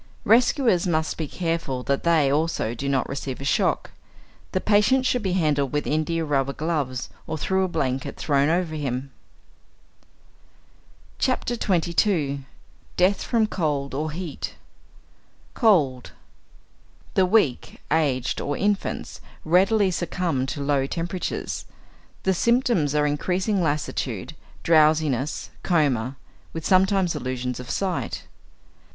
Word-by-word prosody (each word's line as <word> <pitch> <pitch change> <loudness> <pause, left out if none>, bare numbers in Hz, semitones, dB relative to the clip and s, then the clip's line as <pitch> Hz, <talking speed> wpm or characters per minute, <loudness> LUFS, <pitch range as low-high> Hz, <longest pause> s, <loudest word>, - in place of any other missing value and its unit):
Rescuers 230 - +4
must 160 -2 0
be 160 - -3
careful 165 -7 -2
that 140 +1 -1
they, 160 -5 +3
also, 150 -6 0
do 140 +4 -3
not 135 -2 +1
receive 135 -1 -5
a - - -6
shock. 135 - +1 0.6
The 185 - 0
patient 215 +7 +3
should 250 -1 +1
be 190 -3 -1
handled 150 -6 +1
with 150 0 -1
india 160 +2 0
rubber 140 -2 0
gloves 145 -5 -2 0.2
or - - -3
through 190 +5 +1
a - - +1
blanket 135 -6 -2
thrown 140 -1 +2
over 170 -1 0
him. 135 -3 -3 2.1
XXII. 175 - +1 0.5
DEATH 185 +2 +3
FROM 230 -3 +2
COLD 150 -9 -2
OR 155 +3 -2
HEAT 165 -1 -5 1.0
=Cold.= 150 - +2 1.0
The 190 - +4
weak, 180 - +1
aged, 140 -6 +1
or 145 0 -2
infants, 205 0 -2 0.2
readily 190 +4 +4
succumb 170 -6 -1
to 140 +1 -4
low 140 -1 +1
temperatures. 175 +4 -3 0.6
The 190 - +2
symptoms 235 - +2
are 150 0 +3
increasing 185 +7 0
lassitude, 150 -2 -2 0.3
drowsiness, 155 -4 +2
coma, 140 -8 +1 0.4
with 165 -1 -5
sometimes 190 -2 +3
illusions 125 -2 -3
of 125 - -8
sight. 190 -3 -2
160 Hz, 120 wpm, -24 LUFS, 140-185 Hz, 2.1 s, Rescuers